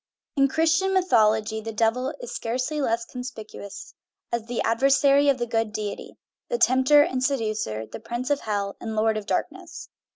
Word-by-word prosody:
In 275 -1 +4
Christian 330 +6 +2
mythology 220 - +2
the 225 +1 -5
Devil 230 +4 0
is - - -7
scarcely 255 +6 -2
less 230 -3 0
conspicuous 225 -6 -8 0.4
as 235 -1 -2
the 245 -1 -3
adversary 275 +4 +4
of 275 - +3
the 240 - -1
good 225 -2 -1
deity, 210 -1 -6 0.3
the 485 - 0
tempter 260 - +5
and 260 -5 -2
seducer, 215 - -1
the 110 - -9
prince 240 +4 -4
of 285 - +2
hell, 200 -2 -3
and 220 -1 -4
lord 220 0 +2
of 215 -1 -5
darkness. - - -4
235 Hz, 165 wpm, -25 LUFS, 220-275 Hz, 0.4 s, tempter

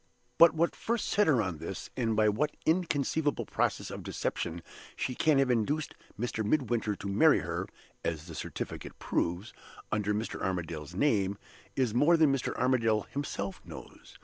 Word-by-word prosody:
But 170 -1 +8
what 170 +2 +1
first 235 -1 -1
set 210 - +3
her 130 -8 +4
on 90 -5 -4
this, - - -6
and 115 -4 0
by 110 0 +4
what 130 +9 0
inconceivable 160 -3 +1
process - - -1
of - - -6
deception 85 +1 -3 0.3
she 125 - -2
can 150 +3 +3
have 135 -2 +3
induced 140 +7 0 0.3
Mr. 115 -1 -1
Midwinter 115 -3 +1
to 100 - -7
marry 100 - +5
her - - -3 0.4
(as 80 -1 -2
the 85 - -9
certificate - - -6
proves) 90 +6 -2 0.4
under 105 -1 0
Mr. 105 +2 -3
Armadale's 85 -3 -3
name, 100 -5 +2 0.4
is 125 -5 +1
more 150 +8 +5
than 155 -4 +5
Mr. 135 - -2
Armadale 115 -4 +2
himself 100 -9 -4
knows. - - -12
115 Hz, 160 wpm, -30 LUFS, 100-145 Hz, 0.4 s, But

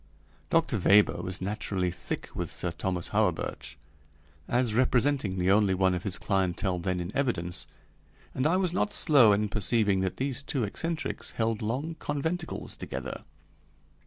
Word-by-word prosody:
Dr. 165 -9 +2
Weber 100 +3 +4
was 95 0 -4
naturally 95 -2 -2
thick - - -5
with - - -4
Sir 90 - -2
Thomas 90 0 -3
Hawerburch, - - -1 0.7
as 120 -2 +1
representing 125 -4 +2
the 90 +1 +2
only 100 -2 +4
one 95 0 +3
of 90 - -2
his 95 -2 -3
clientele 95 -1 0
then 90 +1 -1
in 90 +4 -5
evidence, 90 -11 -1 0.7
and 130 - +1
I 175 +4 +3
was 185 -2 +1
not 205 +3 0
slow 140 - +5
in 105 +1 +2
perceiving 105 -1 +2
that 95 -1 -2
these 135 -1 -1
two 140 -3 -1
eccentrics 165 +10 -3
held 115 -1 -1
long 135 +10 -2
conventicles 160 +4 -3
together. - - -6
105 Hz, 150 wpm, -28 LUFS, 95-140 Hz, 0.7 s, slow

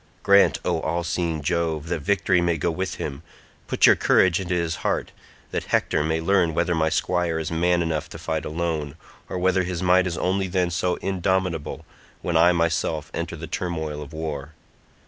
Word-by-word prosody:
Grant, 100 0 +5
O - - +1
all 85 +2 -1
seeing 85 -2 -2
Jove, 80 -1 -1
that 85 -2 -1
victory 90 +1 +2
may 85 -1 +1
go 85 +3 0
with 95 +3 -3
him; 70 +1 -5 0.5
put - - +3
your - - +7
courage 95 -1 +3
into 90 -1 -2
his 85 -2 -1
heart - - -1 0.4
that - - -2
Hector 75 - +1
may 80 +1 0
learn 85 -1 +2
whether 85 +1 +1
my 80 -1 +2
squire 85 +1 0
is 80 0 -3
man 85 +1 +2
enough 80 -2 -2
to - - -9
fight 80 -2 -3
alone, 80 -3 -3 0.3
or - - -3
whether 95 +1 +2
his 90 -1 -3
might 90 +1 +4
is 85 - -3
only 95 +1 0
then 90 -1 0
so 90 +2 0
indomitable 95 -4 -1 0.4
when 85 - -1
I 85 +2 +6
myself 85 -3 0
enter - - -3
the - - -7
turmoil 80 -4 -3
of 75 - -9
war. 80 -2 -5
85 Hz, 185 wpm, -24 LUFS, 80-90 Hz, 0.5 s, your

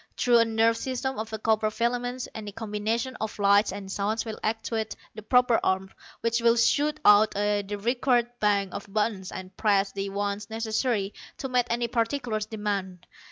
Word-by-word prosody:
Through 240 -1 +4
a 230 - +5
nerve 225 0 +2
system 260 0 -3
of 220 0 -5
copper 220 -1 +2
filaments 245 +3 -2
any 210 -2 -6
combination 225 +4 -2
of 220 -1 -4
lights 200 0 +4
and 195 0 -7
sounds 210 +4 -1
will 220 -1 -6
actuate 220 0 -2 0.2
the 215 - -8
proper 250 +1 +3
arm 190 0 0 0.3
which 230 0 +1
will 230 0 +5
shoot 295 +6 +2
out 210 +1 +7
to 205 0 0
the 205 0 -3
required 240 +2 +1
bank 200 -2 +1
of 200 0 -7
buttons 210 -3 -1
and 185 0 -8
press 200 -2 +2
the 195 0 -4
ones 200 +1 -3
necessary 220 -2 -1 0.2
to 265 - -4
meet 250 -1 +2
any 235 0 0
particular 230 0 -1
demand. 205 -4 -4
220 Hz, 170 wpm, -27 LUFS, 205-235 Hz, 0.3 s, out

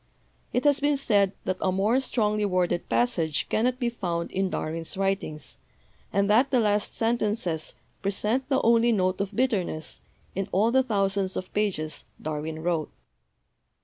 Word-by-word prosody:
It 250 - 0
has 290 -1 +4
been 290 0 +2
said 200 -7 +3
that 185 - -1
a 190 - +2
more 205 +7 +2
strongly 215 -5 0
worded 180 -3 0
passage 170 -11 +1
cannot 245 +3 +1
be 240 -2 +1
found 170 -7 -3
in 190 0 0
Darwin's 165 +1 -3
writings, 195 -6 -2 0.5
and 200 0 +2
that 235 +6 +4
the 255 - +3
last 210 -2 +1
sentences 215 -8 -1 0.3
present 210 +7 0
the 265 -2 +3
only 230 +1 +4
note 185 -3 +1
of 200 +1 -4
bitterness 195 - -1 0.3
in 195 +1 -3
all 215 +5 +3
the 265 +1 +5
thousands 195 -5 0
of 185 - -6
pages 190 -7 -1 0.2
Darwin 155 +1 -4
wrote. 165 -3 0
200 Hz, 150 wpm, -26 LUFS, 180-235 Hz, 0.5 s, the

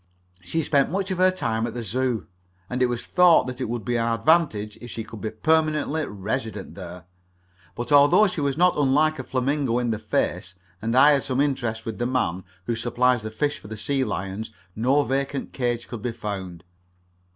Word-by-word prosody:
She 165 - -1
spent 140 -2 +2
much 195 +1 -2
of 185 - -2
her 185 0 +6
time 115 -11 -1
at 115 - -7
the 120 - -4
Zoo, 120 0 -1 0.5
and 125 +1 -2
it 125 - +5
was 120 -1 -3
thought 180 -2 +5
that 125 0 -6
it 125 - -2
would 115 -3 -4
be 120 -1 0
an 115 0 0
advantage 115 -7 +2
if 120 - -9
she 115 - -5
could 110 0 -10
be 110 - -2
permanently 155 +4 +1
resident 105 +1 -4
there. 90 -2 -9 0.7
But 120 +4 -5
although 145 +8 +6
she 180 -6 -2
was 140 -1 0
not 180 +1 +4
unlike 150 +2 +2
a - - -3
flamingo 130 -1 0
in 120 -1 0
the 110 - -2
face, 95 -4 -2 0.3
and 115 +2 -1
I 145 +3 +8
had 140 -2 +3
some 130 -1 -2
interest 120 -6 -1
with 115 -1 -5
the 120 - 0
man 105 -8 -1 0.2
who 120 - -1
supplies 120 +1 +1
the 110 - -5
fish 145 +7 -2
for - - -13
the 110 +1 -7
sea 135 +5 0
lions, 100 -1 -4 0.3
no 130 +6 +3
vacant 135 +1 -2
cage 120 -2 -2
could 120 -3 -7
be 120 0 -3
found. 95 -6 -6
125 Hz, 205 wpm, -24 LUFS, 110-145 Hz, 0.7 s, I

